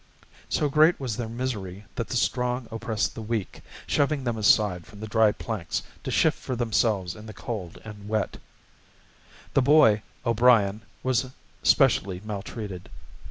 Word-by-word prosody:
So 150 - +1
great 155 +4 +4
was 125 -5 -3
their 115 -2 -3
misery 105 -5 -4
that 115 - -3
the 125 - -1
strong 125 0 0
oppressed 115 0 -2
the - - -7
weak, 110 -2 -3 0.2
shoving 145 -1 +1
them 120 -2 -1
aside 105 -4 +3
from 105 -3 -13
the 110 - -5
dry 110 0 +4
planks 105 -7 -4 0.2
to - - -4
shift - - +2
for 130 - -4
themselves 110 -6 0
in 110 +1 -11
the 110 - -8
cold 100 -7 -6
and 105 -1 -9
wet. 110 -1 -1 1.2
The 140 - +4
boy, 125 -7 +5 0.2
O'Brien, 115 -3 +4 0.2
was 130 0 +1 0.3
specially 95 -2 +3
maltreated. 100 -2 -6
110 Hz, 150 wpm, -26 LUFS, 105-125 Hz, 1.2 s, boy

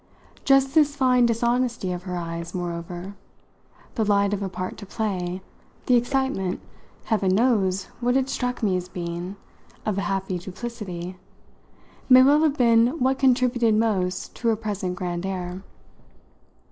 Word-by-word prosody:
Just 270 -1 +4
this 295 -2 +4
fine 250 -3 +4
dishonesty 235 -3 0
of 180 -1 -4
her 180 -1 -3
eyes, 170 0 -5
moreover 175 +2 -5 0.8
the 225 - 0
light 200 -1 +2
of 205 - -2
a 195 - -2
part 185 0 -5
to - - -9
play, 185 -4 -3 0.4
the 250 - +4
excitement 245 -6 0 0.5
(heaven 195 -4 +1
knows 200 -5 +2 0.2
what 245 +2 +2
it 265 -1 +1
struck 250 -2 -3
me 195 -4 +2
as 180 0 -3
being!) 175 +2 -5 0.5
of 205 -2 0
a 200 - -2
happy 195 -2 -2
duplicity 185 -2 -6 0.9
may 255 0 +9
well 290 +3 +5
have 305 -2 +2
been 235 +3 +4
what 265 0 +1
contributed 245 -3 +3
most 190 -4 0
to 235 - -2
her 225 - +4
present 205 -4 -3
grand 175 -1 -3
air. 185 -1 -4
205 Hz, 145 wpm, -24 LUFS, 185-245 Hz, 0.9 s, may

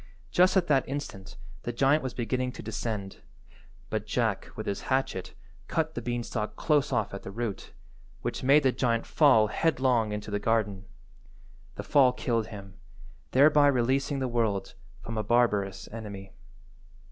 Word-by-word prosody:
Just 185 +2 +4
at 185 - +3
that 135 -6 +2
instant 135 -9 -6 0.2
the 120 - -3
giant 135 +5 +3
was 130 -2 -5
beginning 125 +1 -1
to - - -9
descend, 105 -2 -4 0.7
but - - -2
Jack - - -1
with - - -5
his 100 - -3
hatchet 130 -8 -1 0.3
cut 160 -1 -1
the 120 - -4
beanstalk 120 -2 -3
close 145 -3 +1
off 120 - 0
at 100 - -6
the - - -8
root, 110 0 -5 0.5
which - - -3
made 140 +3 +5
the 130 - +4
giant 115 -3 0
fall 135 -8 +5
headlong 125 -3 +1
into 105 0 -5
the 100 - 0
garden. 105 -3 0 0.9
The - - -5
fall 130 -3 +4
killed 115 -3 -1
him, 100 -1 -10 0.5
thereby 145 +2 +5
releasing 135 +2 +1
the 130 -1 -1
world 115 -5 -1 0.3
from 110 +3 -4
a - - -1
barbarous 105 -4 +1
enemy. 100 -3 -8
120 Hz, 155 wpm, -28 LUFS, 105-135 Hz, 0.9 s, made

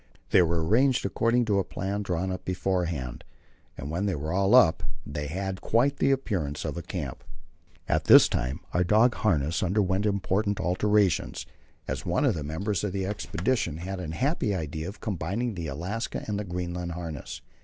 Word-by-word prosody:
They 95 - +7
were 85 -1 +1
arranged 125 +7 +3
according 115 +5 +2
to 100 -3 +2
a - - +1
plan 100 +3 -3
drawn 95 -1 -2
up 95 - -5
beforehand, 90 -9 -2 0.5
and 70 +3 -5
when 95 +5 -1
they 95 - 0
were 75 +3 -3
all 100 +4 +4
up 80 -10 +6 0.2
they 75 0 -4
had 95 +4 -4
quite 140 +5 +2
the - - +2
appearance 95 - -1
of - - -3
a 85 - -4
camp. 80 -6 -5 0.6
At - - +1
this - - +9
time 65 +7 -2
our 90 - +3
dog 110 +6 +4
harness 80 -6 +1
underwent 95 +1 +1
important 100 0 0
alterations, 100 -2 +1 0.4
as 65 +3 -3
one 90 +10 +1
of 130 - +3
the 80 - -4
members 95 +7 -2
of 100 -3 -2
the 95 -1 -1
expedition 95 - -1
had 95 +3 -5
the 80 -3 -5
happy 130 - 0
idea 80 0 -4
of 100 - -11
combining 105 +4 -2
the 85 -4 -5
Alaska 90 +11 -4
and 105 -1 -1
the 105 - -4
Greenland 90 -1 -4
harness. 80 -4 -6
95 Hz, 180 wpm, -27 LUFS, 80-105 Hz, 0.6 s, this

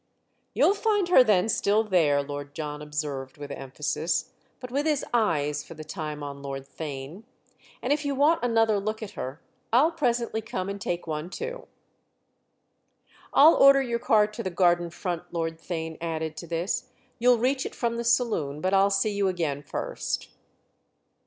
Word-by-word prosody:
"You'll 390 - +5
find 415 -3 +1
her 305 -8 +8
then 210 -4 +3
still 215 0 +2
there," 160 -9 +2
Lord 145 0 -7
John 150 -2 -5
observed 150 -3 -4
with 145 -1 -8
emphasis, 150 +4 -2 0.3
but 250 -1 -8
with 285 +4 0
his 300 -3 +1
eyes 150 -10 +1
for 165 - -11
the 155 - -8
time 155 -2 -5
on 140 -1 -7
Lord 135 -1 -6
Theign; 145 +4 -7 0.6
"and - - +2
if 295 0 -2
you 285 -1 -1
want 300 +5 +3
another 225 -3 +3
look 215 +2 -3
at 205 - -7
her 140 -6 -6 0.3
I'll 275 +8 +5
presently 240 -7 0
come 195 -4 -4
and 200 0 -5
take 175 -1 -3
one 155 +1 -4
too." 485 - -6 1.6
"I'll 310 +4 +8
order 275 0 +6
your 235 -2 -2
car 215 -2 +4
to 210 0 -7
the 185 - -2
garden 175 -1 +2
front," 175 0 -5
Lord 165 -1 -3
Theign 160 -2 -5
added 160 -1 -3
to 170 - -7
this; 170 +4 -2 0.3
"you'll 245 +1 +5
reach 260 +3 +1
it - - -11
from 235 -1 -1
the 235 - -2
saloon, 230 - +1
but 185 +4 0
I'll 195 +1 +5
see 200 +2 +1
you 200 -1 +1
again 165 -6 -1
first." 145 - -4
185 Hz, 170 wpm, -26 LUFS, 150-235 Hz, 1.6 s, her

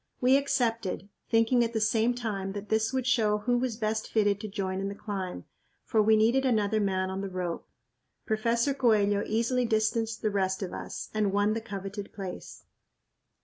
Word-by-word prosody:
We 255 +1 +5
accepted, 230 -8 0 0.2
thinking 230 +2 +4
at 230 0 -2
the 220 - 0
same 225 +2 +2
time 200 -5 -3
that 205 +1 -7
this 220 +1 +1
would 260 -2 -1
show 220 -5 +3
who 240 +4 0
was 245 -3 -2
best 220 -1 -2
fitted 205 -2 +2
to 215 - -4
join 190 -2 -3
in 195 - -2
the 200 - -6
climb, 195 -4 -5 0.4
for 220 -3 +2
we 220 +1 +5
needed 235 +5 +3
another 220 -4 +2
man 190 -2 0
on 190 +1 -3
the 195 - -4
rope. 180 -2 -4 0.6
Professor 235 +4 +1
Coello 210 -6 +3
easily 235 +3 +1
distanced 225 0 0
the 215 - +1
rest 190 -1 0
of 185 - -5
us - - -6
and 210 -2 +1
won 205 +2 +2
the 225 - -2
coveted 200 -1 -6
place. 195 -3 -7
215 Hz, 185 wpm, -28 LUFS, 200-230 Hz, 0.6 s, We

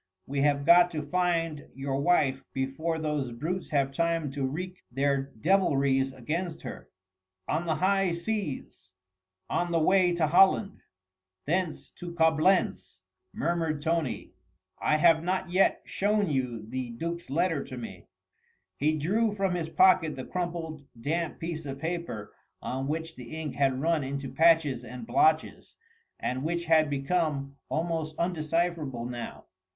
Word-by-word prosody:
We 140 0 -2
have 140 -1 +2
got 175 +2 +7
to 155 -1 -2
find 165 -2 0
your 135 0 -2
wife 140 -5 +2
before 135 +5 -2
those 150 -5 -2
brutes 165 +10 -4
have 140 -2 +1
time 165 -1 0
to 135 -1 -1
wreak 180 +6 -5
their 135 +1 0
devilries 140 - +2
against 160 +7 -4
her." - - -8 0.6
"On 165 +3 -1
the 160 - +1
high 195 0 +2
seas... 170 - -4 0.5
on 175 0 -1
the 165 - +2
way 185 +2 +4
to 170 -2 +2
Holland... 190 +5 +4 0.7
thence 175 +1 -1
to 175 -1 -8
Coblentz 160 +3 +2 0.2
..." 375 - -55
murmured 160 -3 -1
Tony, 165 -4 -1 0.5
"I 150 - +2
have 160 0 +5
not 185 0 -1
yet 190 +2 +3
shown 205 -3 +1
you 125 -5 -2
the 130 +1 -4
duc's 170 +7 -5
letter 165 0 +1
to 130 - -8
me." 105 -7 -8 0.7
He 155 +2 +1
drew 210 +8 +1
from 195 -2 0
his 170 -2 -2
pocket 165 -4 +4
the 130 -1 -6
crumpled, 170 -4 -4 0.2
damp 160 +6 -2
piece 165 -1 -4
of 135 0 -5
paper 160 -9 -4 0.3
on 135 +1 -3
which 160 +2 -3
the 125 +6 -8
ink 155 -4 -4
had 135 -2 +1
run 160 0 +1
into 140 0 -4
patches 160 -6 +4
and 125 -1 -8
blotches, 155 +7 +1 0.4
and 130 +1 -2
which 170 +2 -1
had 160 -2 +4
become 140 -1 -1
almost 160 -1 -2
undecipherable 165 -6 -1
now. 120 -1 -6
160 Hz, 145 wpm, -28 LUFS, 135-170 Hz, 0.7 s, got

